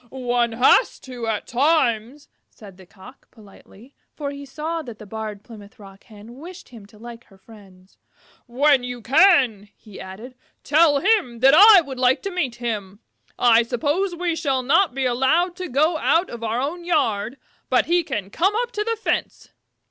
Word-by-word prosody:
"One 245 -2 -2
has 250 - +3
to 245 -3 -8
at 220 -2 -3
times," 265 -1 0 0.2
said 195 -4 -15
the 185 -2 -17
Cock, 215 +9 -17
politely, 220 +3 -19 0.2
for 285 -2 -5
he 280 0 -10
saw 320 +4 -5
that 240 -7 -11
the 215 - -12
Barred 215 0 -7
Plymouth 215 -3 -15
Rock 195 -1 -16
Hen 220 +3 -15
wished 355 +3 -12
him 225 -5 -14
to 210 - -20
like 235 +1 -12
her 195 - -22
friends. 190 -3 -19 0.5
"When 270 +2 +2
you 245 -2 -7
can," 260 - +3
he 210 -3 -14
added, 210 +7 -11 0.3
"tell 300 0 +3
him 385 - +1
that 270 +1 +6
I 405 +3 +8
would 270 -5 -9
like 255 +1 +2
to 395 - -4
meet 295 -10 -3
him. 210 -5 -5 0.4
I 235 -1 +4
suppose 290 +11 -2
we 340 -1 -2
shall 275 -5 -2
not 315 +3 +2
be 270 -1 -2
allowed 270 +9 +1
to 365 -2 -6
go 310 +5 +1
out 340 +4 +1
of 235 -1 -9
our 225 +1 -2
own 315 +7 -4
yard, 260 -8 -1 0.3
but - - +2
he 350 +1 +1
can 200 - -5
come 385 - 0
up 485 - -8
to 420 -3 -3
the 455 +1 -2
fence. 445 - -4
255 Hz, 180 wpm, -21 LUFS, 220-315 Hz, 0.5 s, I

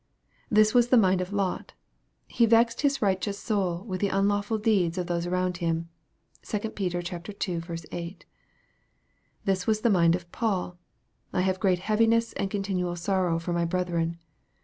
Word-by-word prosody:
This 215 0 +4
was 240 -1 +5
the 250 - +5
mind 190 -4 +4
of 185 +1 -4
Lot: 200 -2 -2 0.3
" - - -46
He 235 - +2
vexed 230 +1 +3
his 280 -4 +1
righteous 195 0 0
soul 190 -5 -1
with 185 -4 -5
the 200 - +3
unlawful 205 +2 +1
deeds" 195 -6 +1
of 180 - -1
those 170 0 -2
around 180 0 0
him. 165 -1 -2 0.5
(2 215 +1 -3
Peter 180 -3 -2
ii. 175 0 -4 0.3
8.) 175 +1 -7 1.2
This 190 -2 0
was 215 -1 +2
the 235 - +3
mind 170 -3 +4
of 175 -1 -8
Paul: 185 -6 -2 0.3
" - - -41
I 180 - +1
have 185 0 0
great 190 -4 +2
heaviness 225 +4 +2
and 195 - -2
continual 190 -3 -2
sorrow 180 -1 0
for 170 +1 -3
my 170 0 +1
brethren." 170 -1 -1
190 Hz, 170 wpm, -27 LUFS, 175-210 Hz, 1.2 s, was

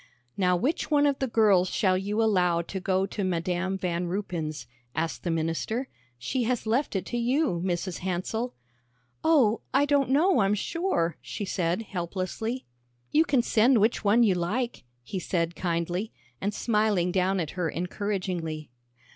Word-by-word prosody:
"Now 180 -2 +2
which 295 - -1
one 290 -1 +4
of 280 -1 +1
the 265 - 0
girls 205 -6 +4
shall 185 -1 +2
you 205 +4 0
allow 180 -5 +2
to 190 +3 -5
go 190 +1 +1
to 200 +1 -4
Madam 185 +1 -1
Van 175 -1 -2
Ruypen's?" 170 - -3 0.3
asked 160 +1 -2
the 175 - -3
minister. 165 +10 -1 0.3
"She 245 - -2
has 245 0 -1
left 235 +3 0
it 190 - -1
to 240 - -2
you, 245 - +1
Mrs. 180 0 -2
Hansell." 190 +7 -2 0.7
"Oh, 270 -9 +4
I 280 +1 +5
don't 285 -2 +2
know, 320 +5 +4
I'm 200 0 +3
sure," 210 - -1
she 205 - -5
said 180 +2 -1
helplessly. 195 +6 -4 0.5
"You 315 +2 +4
can 265 -6 +2
send 235 +3 +4
which 215 +2 +2
one 215 +4 +5
you 205 -4 +4
like," 200 - -2 0.2
he 190 +9 -4
said 170 -1 -1
kindly, 175 +4 -2 0.3
and 200 - 0
smiling 210 -5 +1
down 190 +1 +1
at 160 -4 -2
her 180 -3 -2
encouragingly. 180 - -3
195 Hz, 160 wpm, -27 LUFS, 175-235 Hz, 0.7 s, I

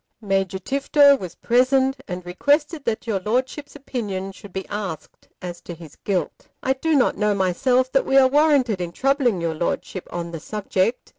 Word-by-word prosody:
Major 195 -3 -1
Tifto 280 +6 +4
was 180 -2 -7
present, 260 +2 +2
and 180 -1 -6
requested 290 - 0
that 230 0 -2
your 215 -4 -1
Lordship's 255 +8 -2
opinion 205 -9 -4
should 200 0 -13
be 190 +1 -5
asked 200 -6 -6 0.2
as 175 -1 -6
to 175 - -8
his 160 -3 -13
guilt. 185 -6 -3 0.2
I 265 - +2
do 315 +4 0
not 265 - +2
know 210 -1 +1
myself 250 +8 +1
that 270 - +1
we 270 - +3
are 265 -1 +7
warranted 275 -8 +3
in 170 -1 -4
troubling 265 - +1
your 165 -1 -1
Lordship 170 +3 -3
on 170 -1 -4
the 165 - -6
subject. 210 +5 -1
215 Hz, 175 wpm, -22 LUFS, 185-270 Hz, 0.2 s, are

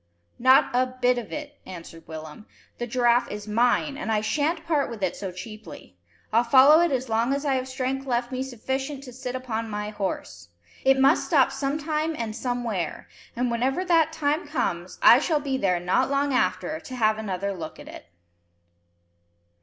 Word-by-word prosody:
"Not 260 +2 +5
a 255 +1 +2
bit 250 0 +3
of 230 - -9
it," 295 -1 -7
answered 165 -3 -11
Willem. 155 +5 -9 0.3
"The 240 - -3
giraffe 240 0 +2
is 210 0 -7
mine, 245 +6 +1
and 225 - -3
I 215 - +2
sha'n't 300 +9 -1
part 300 -6 +1
with 225 -4 -7
it 185 - 0
so 195 -2 -5
cheaply. 210 - -10 0.4
I'll 230 +2 +4
follow 270 +6 +7
it 345 -2 +2
as 260 -1 -1
long 230 +4 +1
as 280 +1 -4
I 275 - +2
have 260 0 -1
strength 265 +1 -3
left 240 0 -1
me 255 0 -3
sufficient 265 +2 -4
to 250 -3 -10
sit 255 0 -5
upon 230 -3 -4
my 210 0 -4
horse. 185 - -5 0.4
It 270 0 +4
must 270 +4 +3
stop 275 -6 +4
sometime 305 +3 -2
and 220 -2 -4
somewhere; 235 -8 -3 0.3
and, 245 0 0
whenever 265 +9 0
that 330 -3 +3
time 305 +1 -1
comes, - - -3
I - - +9
shall 310 -3 +1
be 280 -2 -2
there 185 -8 +1
not 180 +7 +1
long 280 0 +1
after 185 +7 0
to 260 - -9
have 220 -2 +2
another 200 -1 -3
look 165 -4 -8
at - - -11
it." - - -11
250 Hz, 185 wpm, -25 LUFS, 215-275 Hz, 0.4 s, I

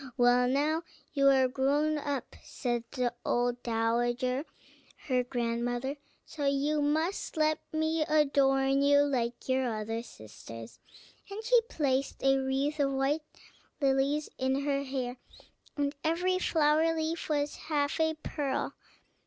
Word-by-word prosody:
"Well, 245 0 +4
now, 295 +5 +1 0.3
you 275 -1 +3
are 265 -1 +5
grown 290 +4 +1
up," 285 -2 -4
said 240 -3 -3
the 250 -3 -1
old 245 0 0
dowager, 240 +4 0 0.6
her 255 -3 +1
grandmother; 245 +2 -2 0.3
"so 295 -3 -5
you 285 +2 +1
must 315 +5 -1
let 310 0 +2
me 315 +1 0
adorn 275 -3 +3
you 285 0 +5
like 245 -4 -2
your 260 -2 +1
other 225 +1 -3
sisters;" 115 - -11 0.5
and 410 +3 -6
she 480 +1 +5
placed 275 -3 -1
a 270 0 +4
wreath 270 +3 -1
of 275 -1 +2
white 270 +4 +1 0.6
lilies 275 +1 +1
in 265 +1 +1
her 280 -1 +1
hair, 260 -2 -3 0.6
and 285 0 0
every 360 +3 +1
flower 320 -1 +3
leaf 320 +1 -2
was 290 -1 0
half 295 0 0
a 320 0 +2
pearl. 280 -3 -2
275 Hz, 130 wpm, -30 LUFS, 250-300 Hz, 0.6 s, are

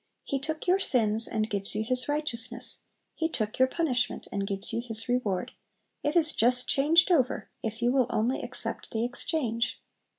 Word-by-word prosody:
He 275 - -2
took 310 +3 -4
your 370 +2 +3
sins 225 - +4
and 215 -1 -1
gives 200 -2 -2
you 215 - 0
His 250 +3 -1
righteousness; 250 -6 0 0.3
He 320 0 -1
took 215 -7 -3
your 260 - +5
punishment 260 -5 -1
and 200 0 -2
gives 195 +2 -4
you 230 - -1
His 225 -1 -2
reward; 220 -7 -1 0.5
it 295 +3 -1
is 320 -2 +5
just 250 +1 +2
changed 325 +6 +4
over, 265 -8 +1
if 225 +1 -4
you 240 - +3
will 260 -2 +2
only 235 +4 0
accept 240 -2 -1
the 225 0 -2
exchange! 240 -3 -1
245 Hz, 175 wpm, -28 LUFS, 225-285 Hz, 0.5 s, your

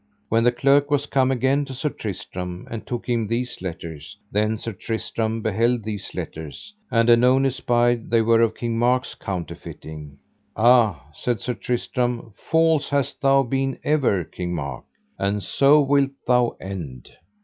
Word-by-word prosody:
When 115 +1 +3
the 120 - +5
clerk 140 +4 +3
was 145 -1 +1
come 135 -2 +2
again 135 +2 +2
to 135 -1 -8
Sir 150 +4 -1
Tristram 90 -5 -6
and 115 -1 -6
took 120 -1 -4
him 115 -3 0
these 120 0 -3
letters, 80 -4 -7
then 105 +2 +1
Sir 115 +1 -5
Tristram 110 +2 -3
beheld 115 +2 +1
these 105 -2 -5
letters, 80 - -7 0.2
and 115 0 +2
anon 125 +3 +5
espied 120 -3 +1
they 115 -1 +3
were 115 0 +4
of 115 -1 +2
King 115 -1 -2
Mark's 125 +1 +1
counterfeiting. 80 -5 -7 0.4
Ah, 115 - +4
said 120 +8 -2
Sir 125 - -2
Tristram, 120 -1 -2
false 160 -2 +2
hast 140 0 -1
thou 135 -1 +4
been 135 +1 -1
ever, 135 - +2
King 90 +1 -5
Mark, 70 -5 -5 0.3
and 100 +1 -1
so 140 - +4
wilt 140 -1 +2
thou 125 -1 +2
end. 85 -10 -7
120 Hz, 155 wpm, -23 LUFS, 100-130 Hz, 0.4 s, the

